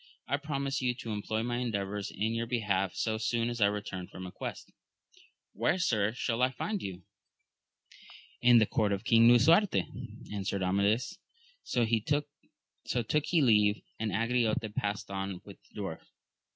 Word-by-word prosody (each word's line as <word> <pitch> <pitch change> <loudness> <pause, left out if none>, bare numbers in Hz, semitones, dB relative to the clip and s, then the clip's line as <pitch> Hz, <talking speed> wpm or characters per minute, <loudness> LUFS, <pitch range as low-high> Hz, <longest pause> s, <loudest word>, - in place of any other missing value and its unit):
I 140 - +1
promise 140 -2 -2
you 125 -1 0
to 115 -2 -6
employ 110 +1 -2
my 120 0 -1
endeavours 105 -4 -2
in 110 +3 -2
your 115 0 -2
be 120 0 -1
half, 95 -3 0
so. 110 -1 -1
soon 115 +1 0
as 120 -1 -5
I 100 - +6
return 100 -3 -4
from 95 - -9
a 90 - -7
quest. - - -7 0.4
— - - -28
^Where, 120 - +1
sir, 110 - +2
shall 120 -1 -1
I 130 - +4
find 200 - -3
you? 95 -2 -6 0.7
— - - -21
In 120 0 +7
the 110 - +6
court 105 -1 +1
of 100 - -3
King 115 0 +6
Lisuarte, 135 - +5 0.5
answered 100 -1 -2
Amadis. 105 - +1 0.4
So 120 -2 0
took 145 +2 -2
he 170 -3 +3
leave 105 -3 +4 0.2
of 110 0 -1
Angriote 115 +2 +1
and 110 -1 -6
passed 100 -1 -2
on 95 -1 -3
with 100 - -12
the - - -11
dwarf. 95 -5 -4
110 Hz, 170 wpm, -30 LUFS, 100-125 Hz, 0.7 s, In